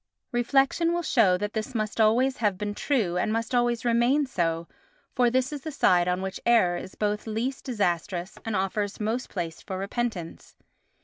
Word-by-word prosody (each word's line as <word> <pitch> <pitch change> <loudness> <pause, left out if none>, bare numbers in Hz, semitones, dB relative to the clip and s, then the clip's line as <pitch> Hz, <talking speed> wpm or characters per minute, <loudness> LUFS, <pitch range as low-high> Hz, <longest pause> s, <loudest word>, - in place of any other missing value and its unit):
Reflection 270 +7 +2
will 345 0 -1
show 205 - +4
that 210 +2 -3
this 220 +3 -4
must 215 0 -1
always 250 +5 +3
have 205 -4 +1
been 205 +1 -3
true, 205 -8 0
and 195 - 0
must 230 +2 -2
always 240 0 +1
remain 240 +5 +3
so, 170 -8 -1 0.5
for 245 -1 +3
this 260 +3 0
is 290 - -5
the 315 - -5
side 180 -10 +3
on 180 +1 0
which 190 0 -4
error 225 -7 +4
is 185 - -7
both 210 +1 -1
least 235 +5 -3
disastrous 180 -5 -2
and 225 -2 -2
offers 195 +2 -1
most 225 +4 -2
place 170 -4 -5
for 190 - -5
repentance. 200 -3 -4
220 Hz, 180 wpm, -26 LUFS, 190-245 Hz, 0.5 s, show